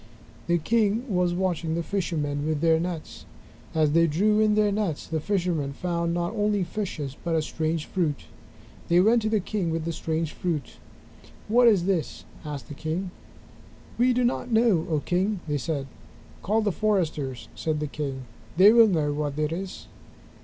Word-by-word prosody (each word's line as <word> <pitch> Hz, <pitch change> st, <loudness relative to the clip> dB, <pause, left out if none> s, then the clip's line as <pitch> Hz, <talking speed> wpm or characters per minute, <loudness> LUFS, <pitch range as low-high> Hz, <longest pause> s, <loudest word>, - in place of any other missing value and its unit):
The 175 Hz, 0 st, +3 dB
king 215 Hz, +5 st, +1 dB
was 180 Hz, -4 st, +1 dB
watching 175 Hz, -3 st, -1 dB
the 170 Hz, -, -1 dB
fishermen 155 Hz, -6 st, -2 dB
with 155 Hz, -2 st, 0 dB
their 165 Hz, -1 st, +4 dB
nets. 170 Hz, -2 st, -5 dB, 0.5 s
As 155 Hz, -2 st, +3 dB
they 165 Hz, +2 st, +4 dB
drew 210 Hz, +8 st, +2 dB
in 215 Hz, -1 st, +3 dB
their 210 Hz, -1 st, +3 dB
nets, 200 Hz, -7 st, -2 dB
the 160 Hz, -, -2 dB
fishermen 170 Hz, -6 st, -1 dB
found 170 Hz, +1 st, -2 dB
not 175 Hz, +3 st, -1 dB
only 205 Hz, -2 st, +1 dB
fishes 170 Hz, -8 st, -4 dB
but 170 Hz, -2 st, 0 dB
a 160 Hz, -, +2 dB
strange 160 Hz, 0 st, -2 dB
fruit. 160 Hz, -7 st, -1 dB, 0.7 s
They 175 Hz, +1 st, +4 dB
went 225 Hz, +5 st, +4 dB
to 215 Hz, -, -1 dB
the 215 Hz, -1 st, +2 dB
king 195 Hz, -2 st, -2 dB
with 160 Hz, -1 st, -2 dB
the 170 Hz, -, -2 dB
strange 160 Hz, 0 st, -2 dB
fruit. 160 Hz, -7 st, -3 dB, 0.7 s
"What 240 Hz, +3 st, +5 dB
is 200 Hz, -6 st, +4 dB
this?" 185 Hz, -5 st, -1 dB, 0.2 s
asked 145 Hz, -6 st, -6 dB
the -, -, -8 dB
king. 165 Hz, +5 st, -3 dB, 0.9 s
"We 250 Hz, +1 st, +4 dB
do 250 Hz, 0 st, +1 dB
not 245 Hz, 0 st, -1 dB
know, 220 Hz, -7 st, +3 dB
O 155 Hz, -3 st, +1 dB
King," 190 Hz, +3 st, 0 dB
they 145 Hz, -1 st, -1 dB
said. 140 Hz, 0 st, -2 dB, 0.6 s
"Call 215 Hz, +4 st, +1 dB
the 205 Hz, -, +1 dB
foresters," 165 Hz, -, -1 dB
said 155 Hz, -2 st, -2 dB
the 150 Hz, -, -2 dB
king, 140 Hz, -3 st, -4 dB, 0.3 s
"They 195 Hz, +4 st, +8 dB
will 230 Hz, -1 st, +7 dB
know 155 Hz, -7 st, +1 dB
what 145 Hz, -1 st, -3 dB
it 155 Hz, 0 st, 0 dB
is." 185 Hz, +3 st, -5 dB
170 Hz, 175 wpm, -26 LUFS, 155-205 Hz, 0.9 s, They